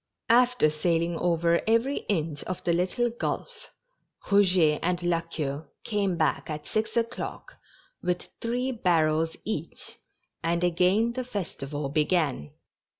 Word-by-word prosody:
After 245 Hz, -8 st, +5 dB
sailing 165 Hz, +2 st, 0 dB
over 170 Hz, -1 st, +2 dB
every 230 Hz, +5 st, +2 dB
inch 160 Hz, -6 st, -1 dB
of 185 Hz, -, -5 dB
the 170 Hz, -, +2 dB
little 190 Hz, +8 st, +1 dB
gulf, 460 Hz, -, -4 dB, 0.6 s
Rouget 180 Hz, -6 st, +5 dB
and 175 Hz, 0 st, 0 dB
La 175 Hz, -1 st, +2 dB
Queue 150 Hz, -3 st, -4 dB, 0.2 s
came 200 Hz, -5 st, 0 dB
back 155 Hz, 0 st, 0 dB
at 150 Hz, -1 st, -5 dB
six 220 Hz, +1 st, -1 dB
o'clock 235 Hz, +1 st, -3 dB, 0.4 s
with 180 Hz, 0 st, -2 dB
three 245 Hz, +3 st, -1 dB
bar 180 Hz, -9 st, +3 dB
rels 160 Hz, +1 st, 0 dB
each, 170 Hz, -7 st, -4 dB, 0.4 s
and 170 Hz, +1 st, 0 dB
again 185 Hz, +7 st, +3 dB
the 255 Hz, +1 st, -3 dB
festival 150 Hz, -, -4 dB
began. 150 Hz, -, +1 dB
175 Hz, 130 wpm, -27 LUFS, 160-220 Hz, 0.6 s, After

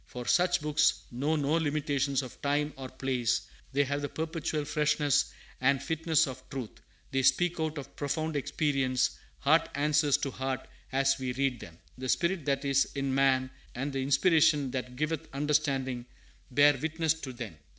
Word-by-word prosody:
For 125 Hz, -1 st, -7 dB
such 175 Hz, +2 st, +3 dB
books 150 Hz, 0 st, +2 dB
know 140 Hz, +6 st, 0 dB
no 145 Hz, 0 st, 0 dB
limitations 145 Hz, -3 st, 0 dB
of 125 Hz, -, -11 dB
time 145 Hz, +1 st, 0 dB
or 130 Hz, -1 st, -7 dB
place; 130 Hz, -3 st, 0 dB, 0.3 s
they 140 Hz, +1 st, +3 dB
have 145 Hz, +1 st, -2 dB
the 145 Hz, -, -3 dB
perpetual 160 Hz, -2 st, -3 dB
freshness 150 Hz, -1 st, +2 dB, 0.3 s
and 135 Hz, +1 st, +3 dB
fitness 160 Hz, +2 st, +1 dB
of 130 Hz, -2 st, -7 dB
truth; 130 Hz, -5 st, -5 dB, 0.4 s
they 135 Hz, -, +1 dB
speak 175 Hz, +5 st, +3 dB
out 160 Hz, -1 st, -1 dB
of 140 Hz, -, -8 dB
profound 155 Hz, +2 st, -2 dB
experience 135 Hz, -3 st, +1 dB, 0.3 s
heart -, -, +4 dB
answers 150 Hz, 0 st, +3 dB
to 135 Hz, -, -3 dB
heart 130 Hz, 0 st, -3 dB, 0.2 s
as 135 Hz, +1 st, +2 dB
we 130 Hz, -1 st, -2 dB
read 135 Hz, -2 st, 0 dB
them; 85 Hz, -6 st, -11 dB, 0.2 s
the 130 Hz, 0 st, -4 dB
spirit 170 Hz, 0 st, +1 dB
that 140 Hz, 0 st, 0 dB
is 140 Hz, 0 st, +3 dB
in 135 Hz, -1 st, -1 dB
man, 130 Hz, -1 st, +2 dB, 0.2 s
and 135 Hz, +3 st, -3 dB
the 135 Hz, -, -1 dB
inspiration 145 Hz, 0 st, +3 dB
that 125 Hz, -1 st, -4 dB
giveth 155 Hz, +3 st, -2 dB
understanding, 135 Hz, -4 st, 0 dB, 0.4 s
bear 145 Hz, +2 st, +5 dB
witness 160 Hz, +1 st, +1 dB
to 155 Hz, -5 st, -7 dB
them. 120 Hz, -8 st, -7 dB
140 Hz, 165 wpm, -30 LUFS, 130-150 Hz, 0.4 s, bear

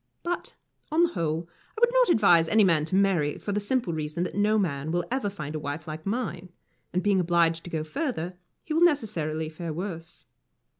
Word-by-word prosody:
But, 350 Hz, 0 st, -3 dB, 0.4 s
on 325 Hz, +2 st, +4 dB
the 345 Hz, -, +3 dB
whole, 165 Hz, -, -2 dB, 0.3 s
I -, -, -3 dB
would 480 Hz, +1 st, +4 dB
not -, -, +4 dB
advise 175 Hz, -, +5 dB
any 215 Hz, +5 st, +4 dB
man 165 Hz, -5 st, +3 dB
to 185 Hz, -, -2 dB
marry, 185 Hz, -7 st, +2 dB
for 205 Hz, -, -4 dB
the 205 Hz, -, 0 dB
simple 210 Hz, -3 st, -1 dB
reason 155 Hz, +2 st, -2 dB
that 180 Hz, -, -4 dB
no 210 Hz, +2 st, +2 dB
man 155 Hz, -6 st, -1 dB
will 175 Hz, 0 st, 0 dB
ever 255 Hz, -5 st, 0 dB
find 155 Hz, -7 st, -6 dB
a 155 Hz, -, -3 dB
wife 150 Hz, +2 st, -5 dB
like 155 Hz, +3 st, -6 dB
mine, 195 Hz, -5 st, -3 dB, 0.4 s
and 180 Hz, -, -1 dB
being 200 Hz, -2 st, +3 dB
obliged 170 Hz, -2 st, +2 dB
to -, -, -6 dB
go 160 Hz, -2 st, -2 dB
further, 180 Hz, -, -3 dB, 0.3 s
he 310 Hz, -, -4 dB
will 325 Hz, -, +2 dB
necessarily 170 Hz, -, +1 dB
fare 160 Hz, +1 st, -5 dB
worse. 165 Hz, -1 st, -6 dB
175 Hz, 205 wpm, -27 LUFS, 160-215 Hz, 0.4 s, advise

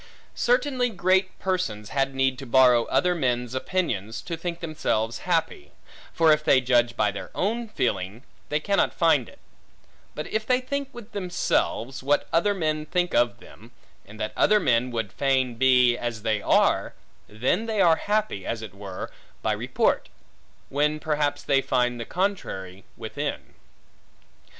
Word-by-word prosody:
Certainly 250 Hz, 0 st, +1 dB
great 185 Hz, -1 st, +1 dB
persons 145 Hz, -, -2 dB
had 135 Hz, -1 st, -1 dB
need 135 Hz, -1 st, +1 dB
to 135 Hz, -, -8 dB
borrow 125 Hz, -1 st, +5 dB
other 180 Hz, 0 st, +2 dB
men's 125 Hz, -6 st, -1 dB
opinions, 130 Hz, -, -2 dB
to 170 Hz, -, -4 dB
think 170 Hz, +1 st, -5 dB
themselves 115 Hz, -9 st, -2 dB
happy; 175 Hz, -, 0 dB, 0.4 s
for 165 Hz, -1 st, +4 dB
if 150 Hz, 0 st, +3 dB
they 145 Hz, -4 st, +5 dB
judge 120 Hz, -2 st, +2 dB
by 105 Hz, -1 st, +2 dB
their 100 Hz, -, -7 dB
own 230 Hz, +5 st, -1 dB
feeling, 100 Hz, -, -2 dB, 0.3 s
they 150 Hz, -, +1 dB
cannot 200 Hz, +6 st, +1 dB
find -, -, +3 dB
it; -, -, -17 dB, 0.8 s
but -, -, -4 dB
if 215 Hz, -, 0 dB
they 250 Hz, +3 st, +2 dB
think 280 Hz, +2 st, -4 dB
with 240 Hz, -3 st, -11 dB
themselves, 175 Hz, -, -1 dB
what 145 Hz, +2 st, +1 dB
other 200 Hz, +5 st, +3 dB
men 155 Hz, -3 st, -1 dB
think 180 Hz, +1 st, 0 dB
of 120 Hz, 0 st, +2 dB
them, 115 Hz, +1 st, -16 dB, 0.3 s
and 105 Hz, +2 st, -14 dB
that 110 Hz, -1 st, -3 dB
other 210 Hz, 0 st, +4 dB
men 125 Hz, -, +2 dB
would 115 Hz, -5 st, -3 dB
fain 130 Hz, -2 st, +1 dB
be, 125 Hz, 0 st, +4 dB
as 115 Hz, -3 st, -4 dB
they 110 Hz, -2 st, 0 dB
are, -, -, +2 dB, 0.3 s
then 125 Hz, -, 0 dB
they 220 Hz, -2 st, -1 dB
are 170 Hz, -4 st, +5 dB
happy, 210 Hz, -, -1 dB
as 115 Hz, +2 st, -4 dB
it 105 Hz, -4 st, -8 dB
were, 100 Hz, -2 st, -7 dB, 0.3 s
by -, -, +1 dB
report; -, -, 0 dB, 0.6 s
when 150 Hz, +2 st, +1 dB
perhaps 150 Hz, -2 st, -1 dB
they 135 Hz, -1 st, +2 dB
find 125 Hz, -2 st, 0 dB
the 115 Hz, -, -4 dB
contrary 100 Hz, -, -3 dB
within. -, -, -5 dB
135 Hz, 155 wpm, -25 LUFS, 120-185 Hz, 0.8 s, borrow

